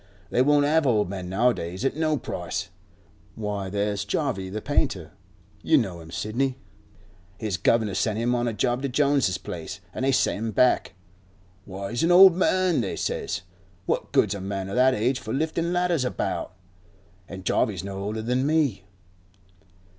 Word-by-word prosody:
"They 125 - +3
won't 145 +1 +4
have 155 0 +3
old 105 -6 +2
men 90 -2 -5
nowadays, 95 -2 0
at 135 - 0
no 155 -1 +1
price." - - -4 0.7
Why, 105 -3 -3
there's 100 +1 -1
Jarvey 95 -1 -2
the 105 +3 -4
painter; 110 - -1 0.5
you 160 - +4
know 95 -9 -1
him, 80 -1 -12
Sidney. 125 +9 -2 0.8
His 105 -4 -2
guvnor 110 +3 +2
sent 110 +1 0
him 120 +2 +1
on 120 0 0
a 115 - -1
job 120 +3 0
to 140 - -2
Jones's 140 - +2
place, - - -7
an' - - -5
they 135 +1 +2
sent 130 - +2
him 115 0 -2
back. 125 -3 +3 0.7
"Why, 100 0 -6
he's 120 - -1
an 165 - +3
old 185 0 +9
man," 185 -4 +2
they 100 - -3
says. 90 - -3 0.4
"What - - -2
good's 105 - +3
a 100 - -6
man 95 0 -4
of 100 - -4
that 130 +1 +4
age 125 +5 0
for 110 - -5
liftin' 160 +3 -1
ladders 175 -5 +1
about?" 125 -6 -3 0.7
An' 95 -1 -8
Jarvey's 95 - 0
no 100 0 -5
older 105 +3 -3
than 125 +4 0
me. 145 -11 +1
115 Hz, 170 wpm, -25 LUFS, 100-140 Hz, 0.8 s, old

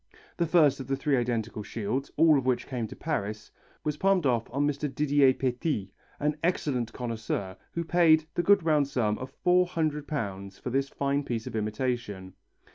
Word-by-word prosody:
The 170 - +1
first 155 -5 +4
of 130 - -6
the 135 - 0
three 140 +1 +1
identical 115 -3 -1
shields, 115 +5 -3
all 160 -2 +6
of 135 - +1
which 125 -2 +1
came 120 -4 -3
to - - -10
Paris, 110 -9 -3 0.3
was 150 -1 -2
palmed 190 -1 +2
off 120 -3 +1
on 140 +2 +1
Mr. 145 0 -1
Didier 140 -1 +4
Petit, 125 - -2 0.3
an 150 +1 0
excellent 135 -9 0
connoisseur, 110 -6 -4 0.2
who 170 - -2
paid 160 -2 +4
the - - +1
good 200 +1 +4
round 150 -3 +3
sum 110 -6 0
of 130 +1 -7
£400 150 - 0
for 125 - -5
this 135 +2 0
fine 140 +1 -1
piece 115 -4 -3
of - - -6
imitation. 105 -3 -3
135 Hz, 175 wpm, -28 LUFS, 115-150 Hz, 0.3 s, all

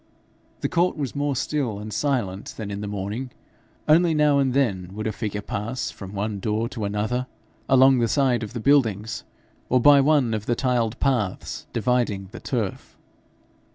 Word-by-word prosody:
The - - +1
court 175 0 +1
was 140 -3 -3
more 145 -1 0
still 130 -5 -1
and 105 +1 -7
silent 120 -10 -2
than 105 -2 -5
in 100 0 -4
the 105 - -4
morning; 105 +6 -4 0.6
only 165 +1 +5
now 150 -2 +4
and 135 -2 +2
then 100 -10 +1
would 110 - -4
a 110 - 0
figure 105 -1 -4
pass 115 +6 -3
from 95 0 -10
one 100 0 -2
door 110 +3 -1
to 115 -5 -4
another, 110 +5 -1 0.4
along 130 0 +6
the 115 - +2
side 130 -1 +2
of 110 +1 -6
the 120 - -4
buildings, 110 - +2 0.5
or 125 - +4
by 140 +2 +7
one 140 -5 +3
of 105 -1 -3
the 120 - +2
tiled 120 -2 0
paths 120 -9 -1
dividing 115 -5 0
the - - -8
turf. 110 -7 -4
120 Hz, 175 wpm, -24 LUFS, 105-135 Hz, 0.6 s, by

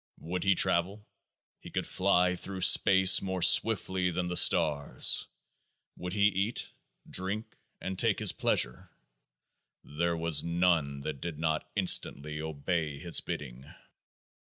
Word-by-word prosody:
Would 90 +3 -6
he 100 -1 +2
travel? 95 +6 0 0.5
He - - -12
could - - -4
fly 90 -1 +1
through 95 +1 -7
space 95 0 +5
more 95 -2 -4
swiftly 95 -4 +2
than 90 +1 -3
the 90 0 -4
stars. 80 -6 +3 0.7
Would 90 0 -7
he 100 -1 -1
eat, 105 +2 -1 0.4
drink, 100 +4 -5 0.2
and 95 0 -6
take 115 -4 +1
his 105 -4 +2
pleasure? - - -1 0.9
There 85 +3 -3
was 80 -2 +1
none 85 -5 -1
that 70 -1 -7
did 85 -3 -6
not 80 0 -3
instantly 75 +2 +1
obey 80 0 -4
his 85 +3 -1
bidding. 65 -2 -8
90 Hz, 130 wpm, -28 LUFS, 80-95 Hz, 0.9 s, space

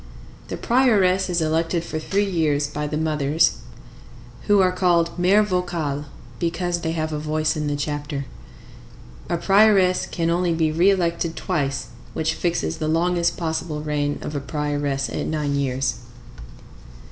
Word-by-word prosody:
The - - -5
prioress 200 -7 +3
is 175 -1 +1
elected 165 +2 0
for 155 - -4
three 200 +6 0
years 155 -6 +1
by 150 +1 -4
the 150 +1 -2
mothers, 155 0 +2 0.9
who 205 -1 +5
are 185 -1 +4
called 175 -2 +2
mères 200 +4 +4
vocales 170 -7 -2 0.3
because 175 0 -1
they 160 -1 -2
have 155 -1 -2
a 150 - -2
voice 155 +1 0
in 150 -1 -2
the 145 - -1
chapter. 145 -1 -3 1.0
A 170 - 0
prioress 195 0 +4
can 165 -1 -1
only 175 -1 +1
be 160 -1 +1
re 170 +5 +4
elected 170 -3 0
twice, 140 -7 -2 0.3
which 160 0 0
fixes 170 -1 -1
the 155 - -1
longest 170 +2 +1
possible 160 -2 -3
reign 145 -1 -1
of 150 - -5
a - - 0
prioress 145 -1 -2
at - - -3
nine 150 -2 -1
years. 135 -3 -1
160 Hz, 150 wpm, -22 LUFS, 150-180 Hz, 1.0 s, who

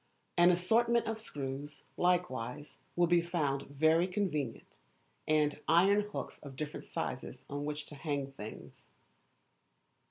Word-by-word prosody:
An 175 +1 +7
assortment 230 +7 +3
of 225 0 -2
screws, 145 -6 -5
likewise, 150 -7 0 0.2
will 175 - +4
be 175 0 +4
found 155 -6 -1
very 160 +5 +3
convenient, 180 - -3 0.5
and 150 -1 +2
iron 195 +5 +5
hooks - - -5
of 140 -2 -10
different 150 +1 -5
sizes - - -4
on 145 +1 -4
which 150 0 -3
to - - -10
hang 140 -2 -3
things. 110 -5 -10
155 Hz, 125 wpm, -33 LUFS, 140-180 Hz, 0.5 s, An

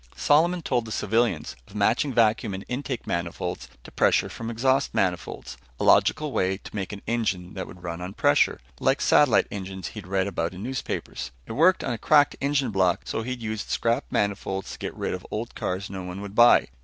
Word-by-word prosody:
Solomon 170 +4 +3
told 120 -5 0
the 110 - -8
civilians 115 -8 0
of 100 - -16
matching 110 +7 +2
vacuum 110 -3 +2
in 95 - -7
intake 130 -1 -4
manifolds 85 -1 -3
to - - -12
pressure - - +2
from 115 0 -6
exhaust 130 +4 +1
manifolds. 90 -8 -2 0.2
A - - -1
logical 155 -1 +4
way 95 -4 0
to 105 - -12
make 95 -3 -3
an 100 -1 -8
engine 105 -6 -1
that 95 - -5
would 90 0 -13
run 85 0 -5
on 95 +3 -6
pressure, 70 - +3 0.2
like - - +2
satellite - - +4
engines 95 -2 -5
he'd 105 -4 -9
read 95 0 +1
about 90 -2 -2
in 95 - -7
newspapers. 130 - -4 0.2
It - - -9
worked 165 +10 +4
on - - -1
a 115 - -5
cracked 145 -2 +4
engine 140 -3 +1
block, 95 -3 +2
so - - -2
he'd 125 0 -5
used 110 -1 -4
scrap 115 +4 0
manifolds 95 -1 -1
to - - -9
get - - -5
rid - - -2
of - - -5
old - - -4
cars 95 +2 -3
no 95 -1 -6
one 90 +1 -6
would 100 -1 -7
buy. 120 - +6
105 Hz, 205 wpm, -25 LUFS, 95-120 Hz, 0.2 s, buy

